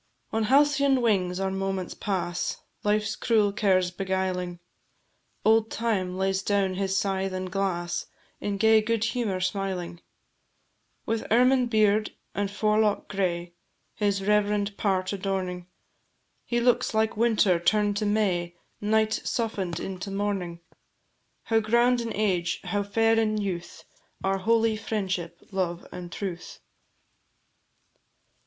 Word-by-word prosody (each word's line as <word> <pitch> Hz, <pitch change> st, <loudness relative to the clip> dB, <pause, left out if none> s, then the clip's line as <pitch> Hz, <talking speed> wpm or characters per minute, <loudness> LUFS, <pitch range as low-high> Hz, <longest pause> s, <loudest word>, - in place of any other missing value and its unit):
On 220 Hz, 0 st, +1 dB
halcyon 280 Hz, +1 st, +4 dB
wings 185 Hz, -5 st, +1 dB
our 195 Hz, 0 st, -1 dB
moments 195 Hz, -1 st, -2 dB
pass, 180 Hz, -3 st, -2 dB, 0.3 s
Life's 210 Hz, 0 st, +1 dB
cruel 215 Hz, -4 st, +2 dB
cares 185 Hz, -3 st, +2 dB
beguiling; 185 Hz, -2 st, -2 dB, 0.9 s
Old 220 Hz, 0 st, +4 dB
Time 190 Hz, -6 st, -1 dB
lays 190 Hz, 0 st, 0 dB
down 200 Hz, -2 st, +1 dB
his 195 Hz, +1 st, -1 dB
scythe 195 Hz, -1 st, -1 dB
and 185 Hz, 0 st, -4 dB
glass, 180 Hz, -3 st, -2 dB, 0.3 s
In 205 Hz, -1 st, -2 dB
gay 220 Hz, +1 st, +5 dB
good 225 Hz, 0 st, 0 dB
humour 230 Hz, -5 st, -1 dB
smiling: 185 Hz, -3 st, -3 dB, 1.0 s
With 225 Hz, 0 st, -2 dB
ermine 250 Hz, +2 st, +4 dB
beard 215 Hz, -2 st, +2 dB, 0.2 s
and 200 Hz, 0 st, -1 dB
forelock 210 Hz, 0 st, +1 dB
gray, 175 Hz, -3 st, -2 dB, 0.4 s
His 200 Hz, -2 st, 0 dB
reverend 205 Hz, -1 st, +1 dB
part 190 Hz, -2 st, 0 dB
adorning, 185 Hz, -2 st, -3 dB, 0.8 s
He 240 Hz, -, 0 dB
looks 240 Hz, -2 st, +2 dB
like 220 Hz, 0 st, +2 dB
Winter 215 Hz, -5 st, +3 dB
turn'd 205 Hz, +3 st, +2 dB
to 210 Hz, -, -1 dB
May, 180 Hz, -5 st, 0 dB, 0.3 s
Night 220 Hz, +1 st, +2 dB
soften'd 195 Hz, -10 st, -2 dB
into 190 Hz, +1 st, -5 dB
Morning. 195 Hz, -4 st, -2 dB, 0.8 s
How 225 Hz, -1 st, +2 dB
grand 235 Hz, +3 st, +3 dB
in 230 Hz, -1 st, -4 dB
age, 185 Hz, -5 st, 0 dB
how 205 Hz, -, -1 dB
fair 225 Hz, +3 st, +2 dB
in 215 Hz, -1 st, +1 dB
youth, 185 Hz, -4 st, -4 dB, 0.4 s
Are 195 Hz, 0 st, +1 dB
holy 225 Hz, +2 st, +2 dB
"Friendship, 190 Hz, -6 st, -3 dB
Love, 180 Hz, -3 st, -2 dB
and 175 Hz, -1 st, -8 dB
Truth!" 180 Hz, -3 st, -5 dB
200 Hz, 120 wpm, -26 LUFS, 185-220 Hz, 1.0 s, gay